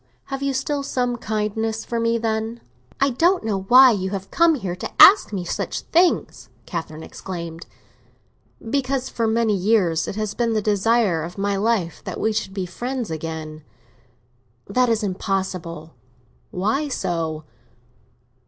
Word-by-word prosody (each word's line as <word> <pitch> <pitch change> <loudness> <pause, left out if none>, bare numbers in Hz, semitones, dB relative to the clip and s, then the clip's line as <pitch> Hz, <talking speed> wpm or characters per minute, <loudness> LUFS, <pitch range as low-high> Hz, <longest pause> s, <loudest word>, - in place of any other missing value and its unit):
"Have 270 - -3
you 275 0 0
still 280 +2 -1
some 250 -3 -1
kindness 220 0 -2
for 235 - -2
me, 230 0 +1
then?" 225 0 -2 0.4
"I 275 0 +3
don't 345 +9 +2
know 210 -3 -1
why 255 +2 +8
you 190 -3 -1
have 195 -1 -6
come 335 -1 +4
here 190 -9 -4
to - - -5
ask 400 - +8
me 190 -4 -3
such - - -3
things!" 345 +1 +1 0.2
Catherine 160 -3 -6
exclaimed. 170 -3 -7 1.0
"Because 265 +1 -1
for 230 -1 -1
many 225 -1 +2
years 185 -5 +2
it - - -4
has 215 -1 -2
been 235 0 0
the 220 - +2
desire 210 -3 +2
of 170 +4 -7
my 200 0 0
life 200 -4 -1
that - - -6
we 220 - +1
should 210 -3 -2
be 190 -1 -3
friends 240 +3 -4
again." 155 -1 -6 1.0
"That 250 +4 +1
is 225 -1 +1
impossible." 185 -5 -3 0.6
"Why 220 +11 -1
so? 165 - -2
215 Hz, 150 wpm, -22 LUFS, 185-240 Hz, 1.0 s, why